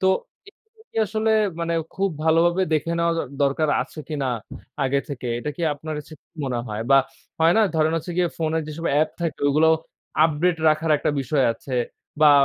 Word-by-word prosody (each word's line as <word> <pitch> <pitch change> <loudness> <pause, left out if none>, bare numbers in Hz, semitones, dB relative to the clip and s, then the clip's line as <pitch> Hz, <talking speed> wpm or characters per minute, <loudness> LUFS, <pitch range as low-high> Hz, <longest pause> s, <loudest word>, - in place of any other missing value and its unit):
তো 190 - +2 0.4
এগুলো 440 +2 -23
কি - - -16
আসলে 220 +1 0 0.3
মানে 170 0 -1 0.2
খুব 195 +1 +1 0.2
ভালোভাবে 170 +3 +3
দেখে 155 +1 +1
নেওয়া 170 0 +2
দ - - +2 0.2
দরকার 140 +3 +2
আছে - - -13
কিনা 145 -4 -2 0.6
আগে 140 +1 +2
থেকে, 130 -4 -5
এটা 150 - -3
কি 175 - -5
আপনার 155 +2 -7
হচ্ছে 150 +2 -9
কি - - -85 0.2
মনে 125 -3 -1
হয়? 105 0 -4
বা 135 - +8 0.4
হয় 165 +1 +6
না, - - +5
ধরেন 160 0 +2
হচ্ছে 165 +2 -4
গিয়ে 180 -1 +2
ফোনে 160 0 0
যেসব 155 +2 -7
অ্যাপ 155 +2 +3
থাকে 170 -2 -2
ওইগুলো 155 +3 +4 0.6
আপডেট 165 +2 +2
রাখার 155 +1 +1
একটা - - 0
বিষয় 135 +1 +1
আছে 130 +3 -7 0.5
বা 155 -1 +8
155 Hz, 190 wpm, -23 LUFS, 145-170 Hz, 0.6 s, বা